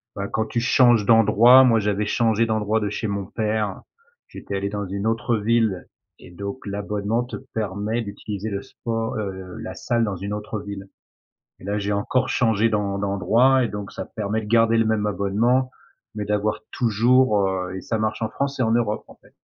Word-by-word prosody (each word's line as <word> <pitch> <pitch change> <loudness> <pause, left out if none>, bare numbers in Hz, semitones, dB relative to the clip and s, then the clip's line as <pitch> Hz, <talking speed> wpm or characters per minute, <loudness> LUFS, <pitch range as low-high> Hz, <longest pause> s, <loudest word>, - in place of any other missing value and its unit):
bah, 100 0 -4
quand 110 0 -1
tu 120 - -2
changes 120 -3 +4
d'endroit, 115 +4 +7
moi, 115 -3 +4
j'avais 105 0 0
changé 115 +1 +2
d'endroit, 110 0 0
de 105 -1 -2
chez 105 +2 -3
mon 100 -1 -3
père, 105 -1 -2 0.5
j'étais 100 - -7
allé 100 +1 -2
dans 100 -1 -4
une 100 +2 -4
autre 115 +1 0
ville 110 -3 +1 0.3
et - - -14
donc 100 +7 -7
l'abonnement 105 +3 -2
te 125 - -7 0.2
permet 105 +2 -2
d'utiliser 105 0 -6
le 100 -1 -3
sport 115 +1 -4
heu, 95 -3 -6
la - - -6
salle 115 -1 0
dans 100 -3 -3
une 100 +3 -6
autre 105 0 -5
ville. 100 -1 -8 0.7
Et - - -15
là, 100 +2 -2
j'ai 100 0 -2
encore 105 +5 0
changé 115 -2 +2
d'en 100 -2 -1
d'endroit 115 +7 +3
et 120 - 0
donc 105 -1 -6
ça - - -6
permet 110 0 -3
de 105 - -8
garder 115 +1 +3
le 115 - +3
même 110 -1 +1
abonnement 110 +7 +1 0.5
mais 105 - -2
d'avoir 105 +1 -1
toujours, 115 -2 +3
heu 95 -1 -3
et 95 - -7
ça 110 - -2
marche 110 +1 -2
en 110 - -1
France 140 0 -3
et - - +1
en 110 - +1
Europe, 115 -3 0
en - - -15
fait. - - -25
105 Hz, 195 wpm, -23 LUFS, 100-115 Hz, 0.7 s, d'endroit